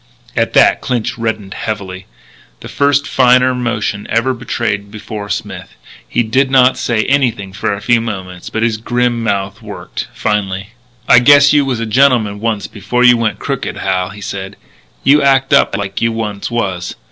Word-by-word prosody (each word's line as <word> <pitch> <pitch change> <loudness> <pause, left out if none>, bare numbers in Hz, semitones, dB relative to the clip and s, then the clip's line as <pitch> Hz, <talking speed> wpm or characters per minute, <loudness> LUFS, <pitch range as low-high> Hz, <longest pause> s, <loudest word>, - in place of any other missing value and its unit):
At 115 -1 0
that - - +4
Clinch 125 -4 -2
reddened 110 -4 -3
heavily 95 -3 -5 0.5
the - - -8
first 140 0 +1
finer 125 0 +4
emotion 120 -5 -3
ever 115 +4 +1
betrayed 115 -4 -3
before 105 0 -7
Smith. 95 -3 -5 0.3
He 120 - +1
did 130 +4 +1
not 130 -1 +4
say 115 -3 0
anything 120 -8 0
for 105 - -2
a 100 0 -4
few 120 -1 +3
moments, 95 -5 -6
but 110 - -2
his 115 -2 +1
grim 120 +1 -1
mouth 100 -2 -2
worked. - - -7
Finally: 95 -1 -2 0.4
"I 120 - +7
guess 145 +3 +6
you 145 -1 +3
was 130 -4 -2
a 115 - -2
gentleman 110 -3 +2
once 110 -3 -2
before 125 +4 -2
you 120 -1 +7
went 115 -4 -1
crooked, - - -4
Hal," 90 -1 -1
he 100 +1 -11
said. 95 0 -6 0.5
"You 145 +2 +5
act 135 0 +2
up 140 -7 +3
like 100 -1 -4
you 115 - +2
once 105 -3 -4
was.... 95 -7 -3
115 Hz, 170 wpm, -15 LUFS, 100-125 Hz, 0.5 s, I